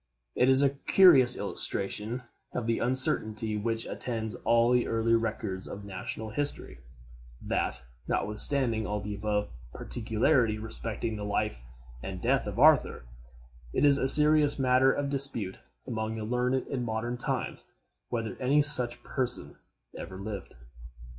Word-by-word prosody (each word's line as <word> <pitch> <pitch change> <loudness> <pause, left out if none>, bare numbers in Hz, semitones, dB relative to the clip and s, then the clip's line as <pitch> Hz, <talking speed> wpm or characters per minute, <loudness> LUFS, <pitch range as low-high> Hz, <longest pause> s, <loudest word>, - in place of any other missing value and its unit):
It 125 - +2
is 135 +1 +6
a 140 - +3
curious 140 -3 +5
illustration 110 +5 -2 0.3
of 125 - -2
the 115 0 0
uncertainty 110 -4 +1
which 115 +2 -2
attends 110 -3 -4
all 115 +3 +2
the 125 -1 +2
early 115 0 0
records 110 -4 -2
of 100 0 -8
national 100 +3 -6
history, 145 +6 -3 0.6
that, 65 +2 -3 0.2
notwithstanding 110 +1 0
all 105 +2 -2
the 105 0 -6
above 105 0 -2 0.2
particularity 115 0 0
respecting 110 0 -4
the 105 - -6
life 105 - -3 0.4
and - - -6
death - - 0
of - - -6
Arthur, - - +3 0.7
it - - +2
is 140 -1 +5
a 130 - +1
serious 150 0 +6
matter 130 0 +3
of 140 0 -3
dispute 130 -9 -1 0.3
among 110 -3 -4
the 110 - -5
learned 125 +3 -1
in 130 -3 -3
modern 115 +1 -3
times 120 - -4 0.4
whether 115 -3 -4
any 140 +3 +3
such 125 -5 +3
person 120 - -2 0.4
ever 95 0 -8
lived. 100 -1 -7
115 Hz, 140 wpm, -28 LUFS, 105-130 Hz, 0.7 s, is